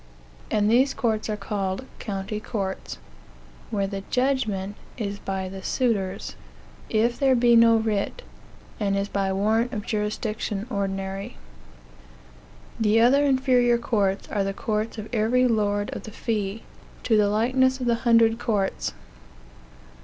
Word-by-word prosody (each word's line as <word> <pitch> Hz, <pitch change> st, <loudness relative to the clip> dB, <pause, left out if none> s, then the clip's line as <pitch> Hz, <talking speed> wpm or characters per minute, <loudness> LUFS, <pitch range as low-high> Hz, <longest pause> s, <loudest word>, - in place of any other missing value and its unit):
And 210 Hz, -1 st, +2 dB
these 255 Hz, +5 st, +3 dB
courts 220 Hz, -3 st, -1 dB
are 210 Hz, -, -1 dB
called 195 Hz, +2 st, -3 dB
county 200 Hz, 0 st, -4 dB
courts, 195 Hz, -3 st, -4 dB, 0.7 s
where 200 Hz, -3 st, 0 dB
the 195 Hz, 0 st, -4 dB
judgment 220 Hz, -7 st, 0 dB, 0.2 s
is 200 Hz, -3 st, -3 dB
by 190 Hz, -1 st, -3 dB
the 190 Hz, +1 st, -7 dB
suitors, 200 Hz, -4 st, -1 dB, 0.5 s
if 235 Hz, +2 st, +1 dB
there 270 Hz, -2 st, +4 dB
be 240 Hz, -1 st, +5 dB
no 230 Hz, 0 st, +7 dB
writ, 220 Hz, -, -1 dB, 0.6 s
and 200 Hz, -2 st, +1 dB
is 200 Hz, 0 st, -1 dB
by 195 Hz, -1 st, -1 dB
warrant 220 Hz, +5 st, +1 dB
of 210 Hz, -2 st, -4 dB
jurisdiction 210 Hz, -1 st, -2 dB
ordinary. 195 Hz, -, -3 dB, 1.4 s
The 220 Hz, 0 st, +3 dB
other 260 Hz, +5 st, +5 dB
inferior 260 Hz, -3 st, +3 dB
courts 205 Hz, -5 st, 0 dB
are 205 Hz, -, 0 dB
the 195 Hz, 0 st, -3 dB
courts 215 Hz, +2 st, -2 dB
of 215 Hz, 0 st, -6 dB
every 240 Hz, +3 st, +3 dB
lord 205 Hz, -3 st, 0 dB
of -, -, -5 dB
the -, -, -9 dB
fee, 210 Hz, -1 st, -3 dB, 0.4 s
to 225 Hz, -, +2 dB
the 210 Hz, -1 st, +4 dB
likeness 260 Hz, +5 st, +2 dB
of 250 Hz, -, -3 dB
the 240 Hz, -, +3 dB
hundred 230 Hz, -1 st, +4 dB
courts. 210 Hz, -5 st, -1 dB
215 Hz, 140 wpm, -25 LUFS, 200-235 Hz, 1.4 s, no